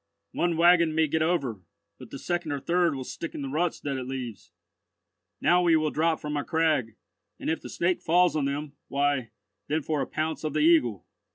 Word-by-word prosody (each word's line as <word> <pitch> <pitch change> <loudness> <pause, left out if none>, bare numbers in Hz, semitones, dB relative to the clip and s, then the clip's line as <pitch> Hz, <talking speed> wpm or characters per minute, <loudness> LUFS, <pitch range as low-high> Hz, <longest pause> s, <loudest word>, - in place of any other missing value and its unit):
"One 175 -2 0
waggon 170 -2 +5
may 160 0 +4
get 155 +1 -1
over, 140 - 0 0.4
but - - -11
the - - -7
second 175 0 -2
or 140 - -2
third 170 +1 +1
will 130 - -4
stick 165 +5 -7
in 145 - -4
the 135 - -4
ruts 165 +5 -1
that 140 -2 -3
it 130 -1 -5
leaves. 125 -5 -6 0.9
Now 175 +1 +4
we 170 -2 +4
will 155 -1 +1
drop 160 +1 +1
from 150 0 -4
our 145 - -1
crag, 155 -9 0 0.4
and - - -1
if 160 - -2
the - - -9
Snake 175 +1 0
falls 175 +1 +3
on 150 -3 +1
them, 140 +1 -3
why, 140 -4 0 0.4
then 155 +1 -1
for 150 -1 -1
a - - -2
pounce 155 +1 -3
of 155 -2 -2
the 155 - +1
Eagle." 150 - +3
155 Hz, 210 wpm, -27 LUFS, 140-165 Hz, 0.9 s, waggon